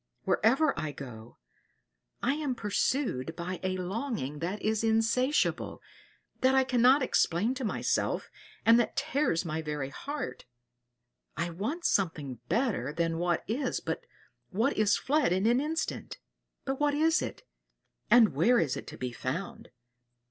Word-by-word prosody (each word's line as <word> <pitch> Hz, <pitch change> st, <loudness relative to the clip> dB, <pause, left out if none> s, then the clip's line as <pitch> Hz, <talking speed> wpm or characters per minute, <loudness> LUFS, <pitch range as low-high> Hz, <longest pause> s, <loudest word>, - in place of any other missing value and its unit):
Wherever 270 Hz, +7 st, +3 dB
I 155 Hz, -2 st, -3 dB
go, 120 Hz, -5 st, -10 dB, 0.9 s
I 245 Hz, -, +3 dB
am 290 Hz, -4 st, -2 dB
pursued 205 Hz, -, -1 dB
by 180 Hz, +1 st, -4 dB
a 185 Hz, 0 st, -1 dB
longing 185 Hz, -, -3 dB
that 180 Hz, +6 st, -3 dB
is 220 Hz, +1 st, 0 dB
insatiable 230 Hz, +5 st, +1 dB, 0.6 s
that 260 Hz, +1 st, +4 dB
I 265 Hz, -, +5 dB
cannot 255 Hz, +2 st, +4 dB
explain 215 Hz, -1 st, +2 dB
to 265 Hz, 0 st, -5 dB
myself, 220 Hz, -, -1 dB, 0.3 s
and 230 Hz, +1 st, +7 dB
that 240 Hz, -, 0 dB
tears 275 Hz, -, 0 dB
my 160 Hz, -1 st, -2 dB
very 150 Hz, -3 st, -3 dB
heart. 285 Hz, -, -5 dB, 0.9 s
I 170 Hz, +2 st, -1 dB
want 230 Hz, -, -4 dB
something 150 Hz, -, 0 dB
better 220 Hz, -, 0 dB
than 165 Hz, +1 st, -1 dB
what 175 Hz, 0 st, 0 dB
is 250 Hz, +4 st, -1 dB
but 480 Hz, -, -4 dB, 0.4 s
what 225 Hz, +8 st, +1 dB
is 210 Hz, -1 st, +3 dB
fled 295 Hz, -, +1 dB
in 190 Hz, +3 st, +1 dB
an 240 Hz, +3 st, +4 dB
instant. 315 Hz, +2 st, -3 dB, 0.5 s
But 270 Hz, 0 st, -2 dB
what 295 Hz, -1 st, +2 dB
is 320 Hz, +2 st, +3 dB
it, -, -, -5 dB, 0.7 s
and 235 Hz, -3 st, +6 dB
where 245 Hz, +1 st, +4 dB
is 140 Hz, -5 st, 0 dB
it -, -, -7 dB
to -, -, -8 dB
be 125 Hz, -1 st, -3 dB
found? 195 Hz, -, -5 dB
220 Hz, 145 wpm, -30 LUFS, 170-265 Hz, 0.9 s, and